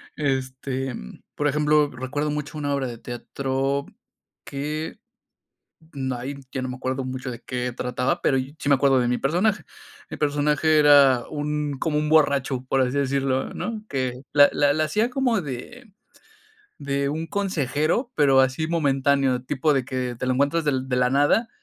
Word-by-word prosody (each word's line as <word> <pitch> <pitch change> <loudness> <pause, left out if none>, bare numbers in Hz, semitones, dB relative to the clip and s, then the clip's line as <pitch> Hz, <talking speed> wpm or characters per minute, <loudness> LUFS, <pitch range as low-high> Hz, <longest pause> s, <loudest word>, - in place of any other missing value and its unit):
Este, 130 -2 -2
mm, 60 - -10
por 150 - 0
ejemplo, 150 0 +3
recuerdo 145 +4 -3
mucho 150 +1 -4
una 145 -1 -1
obra 135 -2 -1
de 120 -1 -7
teatro 135 +3 -2 0.6
que 150 +3 -4 0.9
no, 130 -2 -3
ay, 135 +4 -5
ya 130 - -3
no 130 - -3
me 125 - -5
acuerdo 130 +1 -2
mucho 130 0 -5
de 120 -1 -9
qué 125 0 -3
trataba, 125 +2 -1
pero 135 - +2
sí, 140 +3 -5
me 140 - +6
acuerdo 135 -1 +3
de 120 - +1
mi 125 - +1
personaje. 180 +6 +1 0.5
Mi - - -5
personaje 150 +1 +2
era 140 -4 +6
un 150 -1 -2
como 155 -1 0
un 150 0 -1
borracho, 140 -4 +2
por 135 - +2
así 130 +2 0
decirlo, 135 -1 0
¿no? 220 -2 -4
Que 130 -2 -2
la 145 -1 +7
la 145 -1 +3
la 155 +1 +1
hacía 215 +10 +1
como 250 -5 +1
de 190 - -8 0.9
de 140 0 -1
un 160 +3 -3
consejero, 185 - -1
pero 140 -3 +4
así 130 +4 0
momentáneo, 140 -5 +1
tipo 145 +3 +1
de 135 -2 +1
que 125 -1 -3
te - - -2
lo 130 - +2
encuentras 140 +5 +1
del 130 -3 0
de 125 - +1
la 125 0 +3
nada, 145 - +3
140 Hz, 170 wpm, -24 LUFS, 130-150 Hz, 0.9 s, la